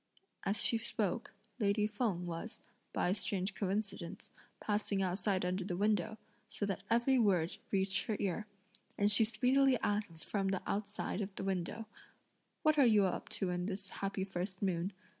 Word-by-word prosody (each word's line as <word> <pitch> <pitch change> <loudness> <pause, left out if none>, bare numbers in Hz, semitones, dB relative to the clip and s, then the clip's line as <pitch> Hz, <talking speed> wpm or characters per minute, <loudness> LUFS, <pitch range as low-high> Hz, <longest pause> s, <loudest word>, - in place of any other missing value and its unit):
As 200 +2 +3
she 230 - +4
spoke, 220 -4 -2 0.2
lady 210 -1 +2
Feng 210 -5 -1
was, 175 +6 -5 0.3
by - - +1
a - - +3
strange 195 -1 -1
coincidence, 195 -2 -3 0.3
passing 205 -2 0
outside 185 0 0
under 185 +1 -1
the 180 -1 -3
window; 210 +1 +1 0.3
so 205 - -3
that 195 -2 -2
every 240 +3 +4
word 180 -7 +2
reached 195 -1 +1
her 215 - 0
ear, 205 +2 -1 0.5
and 205 +1 +4
she 225 - +9
speedily 250 +5 +3
asked 205 -6 -1
from 195 -2 0 0.2
outside 205 0 -2
the - - -4
window: 195 +3 -2 0.8
"What 310 -1 +4
are 275 - +7
you 210 -3 +5
up 185 - -2
to 185 -2 -1
in 180 +1 -2
this 195 -1 -4
happy 195 -1 -3
first 185 0 -4
moon? 185 0 0
200 Hz, 160 wpm, -35 LUFS, 185-215 Hz, 0.8 s, she